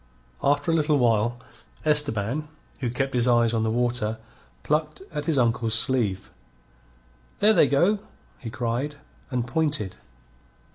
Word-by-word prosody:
After 145 +3 +2
a - - +1
little 150 -2 +2
while, 120 -1 +2 0.5
Esteban, 150 -2 +2 0.3
who 125 -3 -2
kept 135 +3 -2
his 125 -1 +1
eyes 120 -1 +3
on 115 - +1
the 110 - 0
water, 120 -1 0 0.5
plucked 155 +3 -1
at 150 -1 -3
his 155 -2 0
uncle's 115 -2 +2
sleeve. 115 -6 0 1.1
"There 215 +2 +5
they 150 - +5
go!" 175 +10 +2 0.4
he 115 - -7
cried, 120 +6 -3 0.3
and 125 -3 -1
pointed. 145 - -1
125 Hz, 135 wpm, -25 LUFS, 115-150 Hz, 1.1 s, There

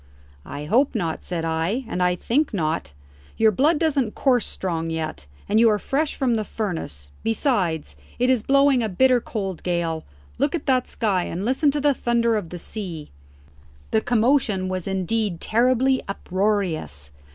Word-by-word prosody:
"I 145 +2 -6
hope 255 - +2
not," 170 -7 -2
said 170 -2 -3
I; 165 +10 -1
"and 185 - -3
I 180 0 +3
think 250 - 0
not. 155 - -1 0.5
Your 220 -1 +5
blood 295 - +3
doesn't 280 -8 0
course 250 -5 +2
strong 165 -3 -3
yet, 155 - -4 0.2
and 215 - +3
you 230 0 +6
are 210 - +3
fresh 285 +8 -1
from 255 -3 +1
the 220 -2 0
furnace. 160 - -5
Besides, 195 - 0 0.2
it 250 - +2
is 250 -4 +2
blowing 275 +1 +4
a 220 - -1
bitter 250 +6 +3
cold 195 -7 -4
gale. 170 -3 -1 0.4
Look 285 +4 +1
at 330 - -4
that 255 -2 +2
sky 195 -6 0
and 185 +4 -4
listen 265 +5 +2
to 290 +1 0
the 290 0 +3
thunder 235 -2 +1
of 205 -6 -3
the 180 - -6
sea!" 175 -5 -6 0.8
The 220 - +3
commotion 230 -5 +2
was 185 -1 -3
indeed 190 0 -1
terribly 255 +3 +2
uproarious. 185 - -2
215 Hz, 165 wpm, -23 LUFS, 175-255 Hz, 0.8 s, you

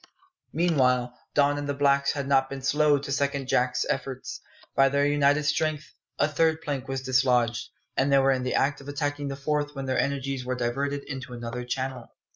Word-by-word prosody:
Meanwhile 125 -7 +2 0.2
Don 145 0 +3
and 145 0 -4
the 145 - -1
blacks 140 0 +3
had 140 -2 -3
not 135 -1 +3
been 135 -1 -6
slow 145 +2 +3
to 140 0 -6
second 140 -1 -1
Jack's 125 0 +1
efforts. 130 -1 -4 0.3
By 135 0 +5
their 140 +1 +2
united 145 0 +3
strength 155 +1 -1 0.2
a - - +3
third 160 +1 +2
plank 135 -3 -3
was 135 0 -3
dislodged, 125 -3 +2 0.3
and 135 +1 +2
they 140 - +6
were 135 0 +4
in 130 -1 +1
the 125 0 -1
act 140 +1 +1
of 140 - -13
attacking 145 0 -2
the 135 - -3
fourth 145 +1 -2
when 135 0 -4
their 130 -1 0
energies 135 -1 -1
were 130 0 -2
diverted 140 +4 -2
into 130 -2 -7
another 120 +1 -5
channel. 130 -1 -4
140 Hz, 195 wpm, -26 LUFS, 130-145 Hz, 0.3 s, they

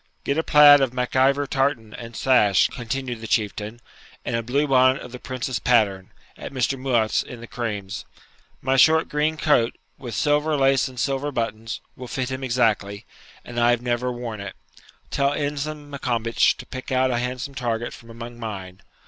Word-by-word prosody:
'Get 140 - 0
a 160 - +2
plaid 145 -2 +8
of 130 -3 +1
Mac 125 0 -2
Ivor 135 +2 +3
tartan 135 -6 -1
and 115 -1 -9
sash,' 115 -8 +4
continued 120 0 -4
the 115 - -6
Chieftain, 105 +1 -1 0.5
'and 120 - -1
a 115 - 0
blue 140 +6 0
bonnet 130 0 +4
of 125 - -10
the 125 - -8
Prince's 130 -2 -3
pattern, 100 -6 +2 0.3
at - - -8
Mr. 130 0 0
Mouat's 125 -5 +1
in 125 - -9
the 120 - -9
Crames. 115 -2 -5 0.6
My 135 +1 +2
short 160 +4 +5
green 150 +2 0
coat, 145 -7 +2 0.2
with 120 -5 -6
silver 150 +3 +2
lace 135 -1 +3
and 130 -2 -9
silver 135 +3 -1
buttons, 115 -3 -3
will 125 - -8
fit 130 +1 -3
him 130 +1 -4
exactly, 110 -5 0 0.4
and 120 0 -5
I 120 0 +4
have 120 0 +2
never 125 +1 -1
worn 120 -3 -6
it. 100 0 -7 0.6
Tell 140 0 +1
Ensign 145 0 -4
Maccombich 115 -4 +1
to - - -9
pick 130 0 -8
out 130 0 +2
a 120 - 0
handsome 125 +2 -4
target 120 -3 -2
from 115 - -14
among 120 +1 -9
mine. 95 -5 -7
125 Hz, 180 wpm, -23 LUFS, 115-135 Hz, 0.6 s, plaid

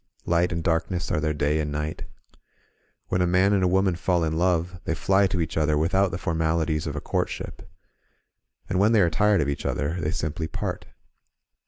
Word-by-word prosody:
Light 85 +1 +2
and 85 -1 -2
darkness 85 +1 -1
are - - +1
their 75 0 0
day 75 +1 +1
and 75 -1 -2
night. 75 +1 -4 1.0
When 90 - +1
a 90 - +2
man 95 +3 +3
and 100 - +2
a - - +4
woman 95 0 +2
fall 85 0 0
in 80 0 -1
love 90 +1 0
they 80 - -2
fly 95 +3 +3
to 95 -1 -2
each 80 0 -2
other 75 -1 +2
without 95 +5 +2
the 85 - -4
formalities 80 -2 0
of 75 - -4
a 75 - -4
courtship, - - -4 0.5
— - - -43
^and 90 - -1
when 105 +4 +4
they 110 - +5
are 85 -2 +3
tired 100 +3 +3
of 70 - 0
each 70 - -3
other 80 +5 -2
they 75 - -1
simply 80 +1 -3
part. - - -4
85 Hz, 205 wpm, -25 LUFS, 80-90 Hz, 1.0 s, they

